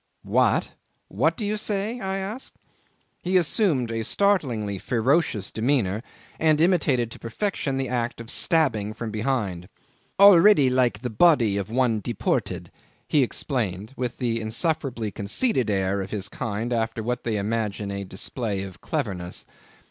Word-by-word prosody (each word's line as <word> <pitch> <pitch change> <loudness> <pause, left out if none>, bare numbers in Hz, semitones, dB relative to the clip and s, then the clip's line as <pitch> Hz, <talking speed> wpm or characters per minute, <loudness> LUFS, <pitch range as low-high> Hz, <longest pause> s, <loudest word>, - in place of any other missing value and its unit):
"What? - - +2 0.4
What - - +1
do 215 - -3
you 210 +1 0
say?" 210 +3 -2
I 190 -2 -2
asked. 205 +7 -6 0.7
He 185 +1 +2
assumed 160 - +1
a 115 0 -2
startlingly 120 - 0
ferocious 120 - +1
demeanour, 110 -4 0 0.4
and 155 -1 +3
imitated 150 -9 +2
to - - -10
perfection 135 - -2
the 135 -1 -1
act 120 0 -2
of 115 -1 -4
stabbing 115 - +2
from 115 -1 -5
behind. 105 -7 -2 0.5
"Already 195 -7 +7
like 125 -4 +1
the 125 -2 -3
body 115 -5 +4
of 100 0 -3
one 120 -2 +1
deported," 100 - -2 0.4
he 150 - +3
explained, 110 -5 -2
with 125 -3 -3
the 115 -3 -1
insufferably 115 - -1
conceited 120 - 0
air 95 0 0
of 95 - -6
his 105 -1 -3
kind 115 +1 -3
after 115 -1 -1
what 125 +2 -2
they 110 -3 -1
imagine 105 -1 -2
a 100 0 -4
display 100 +1 -3
of 95 -2 -10
cleverness. 90 -2 -3
120 Hz, 145 wpm, -25 LUFS, 105-155 Hz, 0.7 s, Already